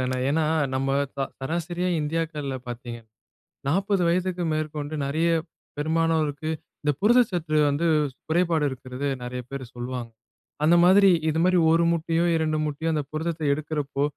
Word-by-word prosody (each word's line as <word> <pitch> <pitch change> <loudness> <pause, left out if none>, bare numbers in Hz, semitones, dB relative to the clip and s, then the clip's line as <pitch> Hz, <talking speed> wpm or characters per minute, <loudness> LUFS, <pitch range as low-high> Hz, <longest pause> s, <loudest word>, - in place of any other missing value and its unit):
தான. 130 0 -1 0.2
ஏன்னா 155 +3 +2 0.3
நம்ம 135 +1 0 0.3
ச - - -13 0.2
சராசரியா 175 +5 -2
இந்தியாக்கள்ல 150 -3 -2
பார்த்தீங்கன்னா, 120 -1 -7 0.6
40 195 +5 +1
வயதிற்கு 180 +1 0
மேற்கொண்டு 155 -1 -3
நெறைய 160 +5 +1 0.5
பெரும்பானோருக்கு 160 -1 0 0.3
இந்த 150 - +2
புரத 235 +5 +5
சத்து 155 -4 -1
வந்து 145 +4 0 0.4
குறைபாடு 165 -2 +2
இருக்கிறது 130 +1 -5 0.2
நெறைய 125 +1 -4
பேர் 140 -1 -5
சொல்வாங்க. 120 -1 -5 0.5
அந்த 165 +3 +5
மாதிரி 195 +2 +7 0.2
இது 160 +1 0
மாதிரி 185 0 +4
1 165 +1 +4
முட்டையோ, 165 0 0
2 155 -1 0
முட்டையோ 155 +2 -2
அந்த 150 -1 0
புரதத்த 160 +1 -3
எடுக்கிறப்போ 145 -2 -2
155 Hz, 135 wpm, -25 LUFS, 140-170 Hz, 0.6 s, மாதிரி